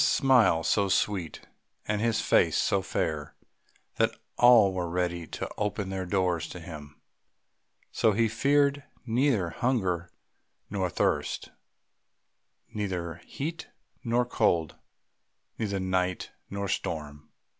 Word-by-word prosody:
His - - +4
smile 130 - +4
was 80 - -3
so 100 -2 +2
sweet 95 -4 0 0.5
and 105 -1 0
his 115 -1 +1
face - - +3
so 100 - +2
fair 80 -5 -3 0.6
that - - +2 0.2
all 115 -6 +6
were 90 -2 -2
ready 85 -1 -2
to - - -5
open 105 -1 -2
their 95 -1 -3
doors 90 -3 0
to 90 - -8
him; 75 -3 -10 0.9
so 110 - +3
he 115 +2 +2
feared 140 +5 +2 0.2
neither 115 - +1
hunger 95 -8 -1 0.6
nor 95 -2 -1
thirst, - - -1 1.2
neither 90 -5 -3
heat 160 +4 -5 0.4
nor 120 +1 +1
cold, 85 - +1 0.8
neither 100 -3 -1
night 95 -1 -1 0.2
nor 100 0 -3
storm. 75 -5 -4
95 Hz, 120 wpm, -28 LUFS, 85-115 Hz, 1.2 s, all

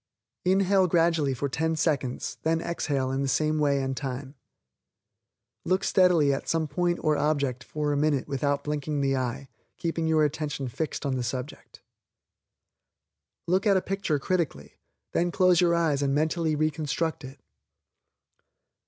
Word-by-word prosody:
Inhale 190 0 +3
gradually 165 -5 +2
for 140 +3 -2
ten 160 +4 -1
seconds, 145 -6 -1
then 165 +1 +1
exhale 140 -6 -2
in 135 +1 -1
the 140 - 0
same 155 +3 +1
way 140 -2 +2
and 135 0 -2
time. 135 0 -5 1.3
Look 185 +2 +1
steadily 175 -7 +4
at 135 - -4
some 160 -1 +1
point 175 +4 0
or 155 -1 +3
object 140 -4 0
for 150 -1 -2
a - - 0
minute 145 -2 +1
without 140 +1 -1
winking 150 0 -2
the 135 -1 +1
eye, 130 +1 -3 0.3
keeping 165 -1 -2
your 160 -1 +3
attention 145 -3 -3
fixed 155 +4 -4
on 135 -2 0
the 120 -1 -1
object. 130 +4 -10 1.6
Look 185 +4 +1
at 200 -2 +5
a - - +4
picture 195 -6 -1
critically, 145 - -3 0.3
then 175 - +1
close 180 0 +4
your 170 -1 +3
eyes 160 -4 +1
and 140 -1 +1
mentally 160 +1 +1
reconstruct 155 +1 -1
it. 135 +2 -10
150 Hz, 150 wpm, -27 LUFS, 140-165 Hz, 1.6 s, at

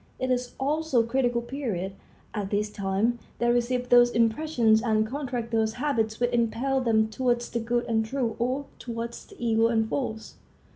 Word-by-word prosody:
It 255 0 -1
is 245 -1 -1
also 285 -2 +1
the - - -7
critical 240 -1 +1
period. 225 -8 -3 0.4
At 205 -3 -3
this 210 +1 -1
time 205 +4 0 0.2
they 240 0 +2
receive 245 +1 0
those 245 0 +7
impressions 230 -1 +2
and 220 -2 +2
contract 250 -2 -4
those 220 -1 +1
habits 230 -5 -1
which 245 0 +1
impel 240 +3 +1
them 220 -3 +3
towards 240 +1 -1
the 235 - -1
good 240 +1 -1
and 220 -1 +1
true 235 0 -2
or 255 +4 -1
towards 235 0 -6
the - - -15
evil 230 -1 +2
and 225 -1 +1
false. 220 -3 -4
235 Hz, 175 wpm, -27 LUFS, 220-250 Hz, 0.4 s, those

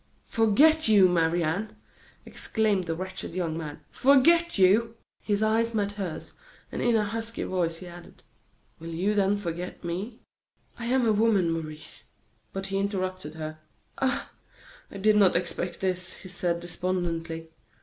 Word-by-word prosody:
"Forget 285 +9 +4
you, 205 -4 +7
Marie 170 -1 +2
Anne!" 200 +7 -2 0.5
exclaimed 210 -5 0
the 165 -1 -2
wretched 185 0 -6
young 170 -4 -1
man, 155 -3 -6
"forget 335 +5 +4
you!" 220 +5 +4 0.2
His 205 0 0
eyes 225 +1 +1
met 205 -1 0
hers, 195 -6 -6 0.4
and - - -4
in 240 -1 +3
a 215 - +3
husky 225 +2 -4
voice 170 -3 -1
he 185 - -10
added: 175 0 -13 0.6
"Will 165 +1 -8
you 195 +5 +1
then 200 0 +2
forget 175 -2 -5
me?" 190 +7 -4 0.6
"I 235 - -4
am 255 0 +2
a 220 - +4
woman, 205 -5 +3
Maurice 155 -2 -6 0.2
" - - -41
But 195 0 -4
he 195 0 -1
interrupted 185 -5 -3
her: 155 0 -6 0.4
"Ah! 260 -2 0 0.6
I - - -9
did 210 +2 +4
not 195 -3 +5
expect 175 0 -2
this," 185 -1 -1
he 185 - -11
said, 175 -2 -1
despondently. 170 -2 -3
190 Hz, 155 wpm, -27 LUFS, 170-220 Hz, 0.6 s, you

